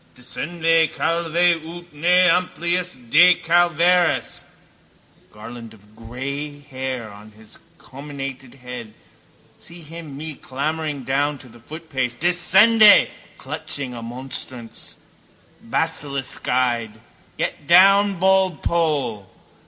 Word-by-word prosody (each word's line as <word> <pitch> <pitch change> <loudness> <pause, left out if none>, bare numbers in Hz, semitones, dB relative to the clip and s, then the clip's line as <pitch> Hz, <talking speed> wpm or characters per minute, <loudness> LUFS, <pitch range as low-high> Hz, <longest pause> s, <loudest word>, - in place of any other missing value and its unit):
Descende, 165 +5 0
calve, 165 -1 -2 0.3
ut 175 +1 -11
ne 180 +4 +3
nimium 175 -7 -2
decalveris. 175 0 +3
A - - -30
garland 115 +1 -11
of 105 0 -23
grey 140 +5 -6
hair 130 -5 -6
on 105 +1 -14
his 110 0 -14 0.2
comminated 135 -1 -9
head 125 -4 -9 0.6
see 170 0 -12
him 155 -2 -10
me 155 +1 -6
clambering 145 +1 -4
down 145 +3 -1
to 130 - -15
the 120 0 -16
footpace 135 -2 -5
(descende!), 190 - +5 0.3
clutching 135 -3 -6
a 120 - -8
monstrance, 120 0 -5 0.7
basiliskeyed. 125 -5 -1 0.4
Get 145 - -4
down, 195 +2 +5
baldpoll! 165 - +1
145 Hz, 95 wpm, -21 LUFS, 125-170 Hz, 0.7 s, descende